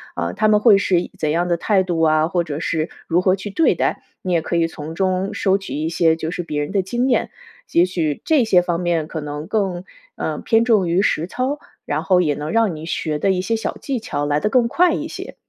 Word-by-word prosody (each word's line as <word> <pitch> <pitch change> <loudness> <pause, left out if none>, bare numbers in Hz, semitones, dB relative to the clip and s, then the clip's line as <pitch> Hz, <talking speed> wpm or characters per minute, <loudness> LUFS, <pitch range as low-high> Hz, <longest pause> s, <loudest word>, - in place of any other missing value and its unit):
啊， - - -2
他 215 - +1
们 210 -1 +4
会 210 -3 +6
是 180 -3 +2
一 - - -8
怎 155 - 0
样 170 +3 +1
的 175 - +2
态 190 +2 +2
度 175 -3 -2
啊， 155 0 +3
或 175 -1 0
者 150 -1 -5
是 160 0 -1 0.2
如 175 +2 +2
何 185 0 +3
去 200 +1 -7
对 320 +11 +3
待。 - - -1 0.2
你 180 -1 -1
也 165 - +2
可 170 - -3
以 170 -1 +3
从 160 0 -7
中 190 0 -1
收 195 0 +2
集 150 -4 -5
一 - - 0
些 165 -1 +2
就 160 0 -4
是 180 - -3
别 150 -3 -3
人 145 - -4
的 195 - +2
经 240 +7 -1
验， - - +1 0.4
也 175 +1 +5
许 160 -5 -2
这 300 -6 +4
些 190 -5 +4
方 175 -1 -1
面 170 -3 0
可 160 -2 -5
能 150 +1 -5
更， 190 -4 -1 0.3
呃， - - -3
偏 225 0 +2
重 210 -7 +3
于 180 +4 +2
实 165 -3 0
操， 260 +8 -2 0.3
然 - - -1
后 180 -2 +3
也 150 -4 +1
能 150 +2 -5
让 225 -5 +2
你 155 +2 -8
学 155 -3 -2
的 195 - +1
一 190 -1 +2
些 190 +5 -1
小 220 - -3
技 265 -4 -3
巧 145 -9 -3
来 145 0 +1
得 210 - 0
更 240 0 +3
快 350 +8 +3
一 - - -2
些。 - - -8
180 Hz, 275 characters per minute, -20 LUFS, 160-205 Hz, 0.4 s, 会